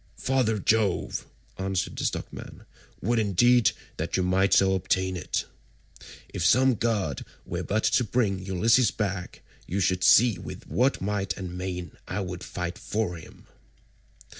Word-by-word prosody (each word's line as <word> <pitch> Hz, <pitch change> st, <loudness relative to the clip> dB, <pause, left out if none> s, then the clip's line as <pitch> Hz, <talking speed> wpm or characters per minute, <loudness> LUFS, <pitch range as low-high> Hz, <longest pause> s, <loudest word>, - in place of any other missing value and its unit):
"Father 130 Hz, -5 st, +1 dB
Jove," 105 Hz, -2 st, 0 dB, 0.3 s
answered 95 Hz, -1 st, -2 dB
the -, -, -3 dB
stockman, -, -, -5 dB, 0.4 s
"would 115 Hz, +4 st, +2 dB
indeed 110 Hz, +4 st, +4 dB, 0.3 s
that -, -, -2 dB
you 95 Hz, -, +1 dB
might 95 Hz, +1 st, +2 dB
so 95 Hz, 0 st, +5 dB
ordain 95 Hz, 0 st, 0 dB
it. 85 Hz, -, -2 dB, 0.9 s
If -, -, -2 dB
some 130 Hz, +8 st, +5 dB
god 105 Hz, -, -1 dB, 0.2 s
were -, -, -4 dB
but 110 Hz, +2 st, -1 dB
to 125 Hz, -, +3 dB
bring 100 Hz, -4 st, 0 dB
Ulysses 110 Hz, +5 st, +3 dB
back, 95 Hz, -2 st, -4 dB, 0.2 s
you 95 Hz, -, -2 dB
should 90 Hz, -1 st, +1 dB
see 115 Hz, -5 st, +6 dB
with -, -, -9 dB
what 130 Hz, +3 st, +1 dB
might 95 Hz, -1 st, -2 dB
and 90 Hz, -2 st, -6 dB
main 90 Hz, -1 st, -4 dB, 0.2 s
I 105 Hz, -, -2 dB
would 90 Hz, -1 st, -5 dB
fight 90 Hz, 0 st, -5 dB
for 105 Hz, -5 st, -2 dB
him." 80 Hz, -, -14 dB
95 Hz, 145 wpm, -26 LUFS, 90-110 Hz, 0.9 s, see